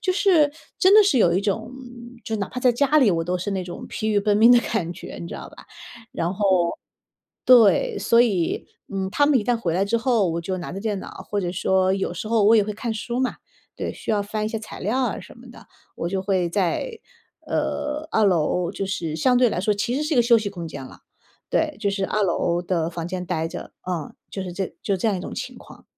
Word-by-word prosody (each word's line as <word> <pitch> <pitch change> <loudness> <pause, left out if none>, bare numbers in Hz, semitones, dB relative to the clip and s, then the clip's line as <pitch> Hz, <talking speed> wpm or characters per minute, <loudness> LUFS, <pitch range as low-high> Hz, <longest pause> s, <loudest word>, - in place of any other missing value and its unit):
就 370 - +1
是 350 -7 +4 0.3
真 380 +2 +6
的 430 - +9
是 285 -11 +3
有 170 -5 +4
一 185 - +2
种， 215 +3 -2
嗯， 245 -1 -12
就 225 - -3
哪 200 -2 -3
怕 255 - -6
在 250 -1 +4
家 280 +4 +2
里 240 -8 +5
我 165 -1 0
都 180 +1 -1
是 185 +3 -3
那 190 -1 -2
种 175 -1 -8
疲 215 - -3
于 210 -1 +3
奔 205 0 +2
命 230 +3 +7
的 245 - +7
感 200 -9 -2
觉， 175 - -9
你 170 - -6
知 - - -7
道 - - -8
吧？ - - -15 0.5
然 170 +2 -1
后 185 -4 +2 0.7
对， 255 - +5
所 230 - +3
以， 195 -9 +1 0.3
嗯， 190 -1 -2
他 285 +7 +3
们 290 -3 +4
一 210 - -3
旦 240 +2 +2
回 170 -7 -2
来 190 - +2
之 205 +4 0
后， 230 -6 +2
我 170 - -2
就 185 +2 -3
拿 175 - -6
着 195 - -5
电 210 -2 -2
脑， - - -8 0.2
或 205 - 0
者 175 -2 -2
说 190 +1 +2
有 195 -2 -2
时 175 - -5
候 225 -2 +3
我 225 +2 +6
也 210 - +4
会 210 - -3
看 225 +2 -4
书 235 +3 -3
嘛， 260 - -1 0.4
对， - - -3
需 - - -6
要 205 -2 +1
翻 215 +1 -3
一 - - -1
些 225 - -3
材 215 - -10
料 220 +7 0
啊 255 - -1
什 - - -13
么 - - -14
的。 - - -15 0.3
我 170 - -3
就 190 +1 -1
会 190 -3 +1
在 210 - -1 0.5
呃， 300 +1 -2
二 220 - +3
楼 175 -1 +1
就 - - -3
是 165 -4 -3
相 250 +10 +3
对 250 -1 +5
来 - - -2
说 210 +2 +2
其 235 +5 -1
实 295 - -1
是 305 +1 -2
一 - - 0
个 240 - +6
休 235 0 +5
息 210 -2 -3
空 170 -4 -7
间 140 -3 -7
啦， - - -14 0.5
对， 305 -2 0
就 205 - 0
是 195 -1 -1
二 215 - 0
楼 175 -1 +1
的 170 -2 -1
房 170 0 -5
间 180 0 -4
呆 165 -2 -1
着， - - -8 0.2
嗯， 170 -5 -4 0.2
就 195 - -4
是 180 - -6
这 190 +1 -4
就 200 - 0
这 225 - +1
样 200 - 0
一 - - -5
种 - - -7
情 - - -6
况。 - - -15
205 Hz, 275 characters per minute, -23 LUFS, 180-240 Hz, 0.7 s, 的